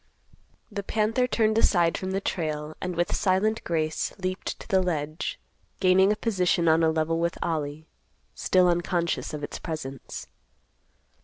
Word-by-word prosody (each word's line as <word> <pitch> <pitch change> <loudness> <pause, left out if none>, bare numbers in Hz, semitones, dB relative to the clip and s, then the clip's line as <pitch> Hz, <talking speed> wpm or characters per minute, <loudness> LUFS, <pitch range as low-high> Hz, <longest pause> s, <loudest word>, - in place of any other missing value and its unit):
The 205 - -3
panther 225 +5 +1
turned 220 -2 +2
aside 170 -6 +3
from 185 - -3
the 190 +1 0
trail 155 -4 -3
and 180 -1 -3
with 175 +1 0
silent 210 +4 +1
grace 155 -2 -1
leaped 185 0 -3
to - - -11
the 190 -1 +3
ledge, 155 -3 -2 0.4
gaining 190 +1 +5
a - - +2
position 180 -6 +1
on 160 +1 +5
a 160 - +4
level 160 +1 0
with 170 +1 0
Ollie—still 160 +3 -1
unconscious 175 -1 0
of 150 -1 -6
its - - -5
presence. 145 -6 -6
175 Hz, 145 wpm, -26 LUFS, 160-190 Hz, 0.4 s, gaining